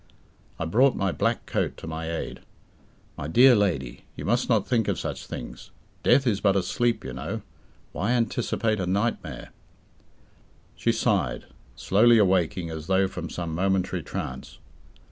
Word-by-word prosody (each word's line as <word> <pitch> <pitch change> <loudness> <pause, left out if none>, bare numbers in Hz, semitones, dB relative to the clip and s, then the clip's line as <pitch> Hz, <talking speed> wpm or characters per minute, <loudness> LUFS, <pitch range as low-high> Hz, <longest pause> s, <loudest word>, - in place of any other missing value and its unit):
I 85 - -3
brought 125 +11 +3
my 95 -1 0
black - - -1
coat - - -2
to - - -9
my 80 0 -4
aid. 85 - -4 0.8
"My 70 - -4
dear 125 - +7
lady, 80 - -1
you - - -6
must 120 +5 +1
not 110 -5 +2
think 115 -4 +1
of - - 0
such - - -5
things. - - -8 0.3
Death 135 - +4
is 105 -5 +1
but 100 -2 +3
a 95 - +2
sleep, 120 +5 0
you 65 - -5
know. 80 - -5 0.5
Why 110 +5 -1
anticipate 115 -2 0
a 90 - -2
nightmare?" 100 +5 -2 1.3
She - - +1
sighed, - - 0 0.3
slowly 115 +4 +4
awaking 90 -3 +2
as 80 0 -7
though 95 0 +3
from 90 -2 -6
some 85 -2 -4
momentary 95 0 0
trance. 70 - -6
95 Hz, 155 wpm, -26 LUFS, 85-115 Hz, 1.3 s, dear